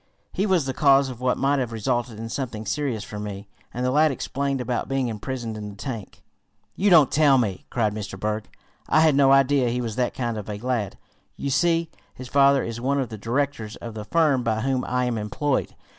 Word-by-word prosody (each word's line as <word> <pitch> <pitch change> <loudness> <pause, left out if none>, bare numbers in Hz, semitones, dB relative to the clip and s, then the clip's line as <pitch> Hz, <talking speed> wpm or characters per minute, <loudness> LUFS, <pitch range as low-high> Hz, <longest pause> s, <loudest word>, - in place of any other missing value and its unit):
"He 200 - 0
was 180 -7 +2
the 135 - -2
cause 135 0 +4
of 125 -1 -9
what 125 0 +1
might 140 +1 +2
have 125 -3 -2
resulted 120 0 -2
in 115 +1 -5
something 115 -3 -4
serious 115 +1 -2
for 105 0 -7
me," 100 -1 -6 0.2
and 125 +1 -3
the 125 - +1
lad 155 +3 +4
explained 140 +1 -2
about 125 +1 -2
being 135 -2 0
imprisoned 115 +1 -5
in 105 -1 -6
the 100 - -10
tank. 115 -2 -7 0.5
"You 205 +2 +2
don't 160 -7 +6
tell 145 -3 +5
me!" 105 -7 -2
cried 110 -4 0
Mr. 100 -2 -6
Berg. 105 +1 -2 0.4
"I 155 - +5
had 160 -2 +5
no 135 -1 +5
idea 135 -2 +4
he 125 +1 -1
was 115 -2 -4
that 125 -1 0
kind 120 -3 -2
of 105 - -8
a 105 - -4
lad. 115 -3 -2 0.4
You 140 - -3
see, 165 +2 +2 0.2
his 130 -1 -9
father 140 0 +4
is 115 0 -5
one 140 +3 +1
of 130 -4 -2
the 110 - -7
directors 120 -1 -2
of 115 -1 -8
the 105 -1 -7
firm 150 0 +2
by 110 -2 -1
whom 130 0 0
I 125 0 0
am 120 -3 -1
employed. 130 +7 -1
125 Hz, 220 wpm, -24 LUFS, 110-140 Hz, 0.5 s, don't